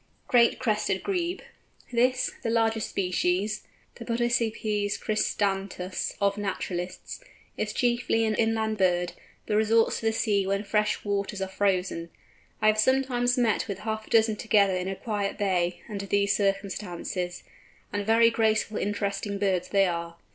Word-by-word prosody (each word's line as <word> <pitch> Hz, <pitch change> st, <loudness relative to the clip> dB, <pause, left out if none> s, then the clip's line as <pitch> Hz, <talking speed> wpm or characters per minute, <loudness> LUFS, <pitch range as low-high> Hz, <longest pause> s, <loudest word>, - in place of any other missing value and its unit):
GREAT 235 Hz, -1 st, +4 dB
CRESTED 210 Hz, -5 st, 0 dB
GREBE. 360 Hz, -2 st, -2 dB, 0.5 s
This, 250 Hz, +2 st, +2 dB
the 230 Hz, -, -2 dB
largest 225 Hz, -1 st, +1 dB
species, 185 Hz, +3 st, -1 dB, 0.3 s
the 235 Hz, -, -9 dB
Podicipes 225 Hz, -3 st, 0 dB
cristatus 195 Hz, -3 st, -1 dB
of 200 Hz, 0 st, +1 dB
naturalists, 185 Hz, -, -4 dB, 0.3 s
is -, -, -2 dB
chiefly 240 Hz, -2 st, +1 dB
an 220 Hz, -, +1 dB
inland 220 Hz, -1 st, 0 dB
bird, 175 Hz, -2 st, +2 dB, 0.3 s
but -, -, -2 dB
resorts 225 Hz, +1 st, +3 dB
to 225 Hz, -, -1 dB
the -, -, +3 dB
sea 205 Hz, -3 st, +1 dB
when 200 Hz, +1 st, 0 dB
fresh 210 Hz, 0 st, 0 dB
waters 200 Hz, 0 st, -2 dB
are 190 Hz, -, -2 dB
frozen. 190 Hz, -3 st, -1 dB, 0.5 s
I -, -, +4 dB
have 215 Hz, 0 st, +4 dB
sometimes 245 Hz, 0 st, +2 dB
met 230 Hz, -4 st, +1 dB
with 200 Hz, -3 st, -4 dB
half 220 Hz, 0 st, -4 dB
a -, -, -16 dB
dozen 220 Hz, -1 st, +3 dB
together 205 Hz, -4 st, +3 dB
in 185 Hz, 0 st, -2 dB
a 195 Hz, -, -2 dB
quiet 205 Hz, -1 st, -3 dB
bay, 180 Hz, -3 st, 0 dB
under 200 Hz, -3 st, -5 dB
these 200 Hz, 0 st, +2 dB
circumstances, 195 Hz, -3 st, -2 dB, 0.5 s
and 205 Hz, 0 st, -1 dB
very 230 Hz, +2 st, +5 dB
graceful 220 Hz, -1 st, +1 dB
interesting 200 Hz, 0 st, -2 dB
birds 190 Hz, -3 st, 0 dB
they 195 Hz, -1 st, +4 dB
are. 170 Hz, -1 st, -3 dB
205 Hz, 145 wpm, -27 LUFS, 195-225 Hz, 0.5 s, very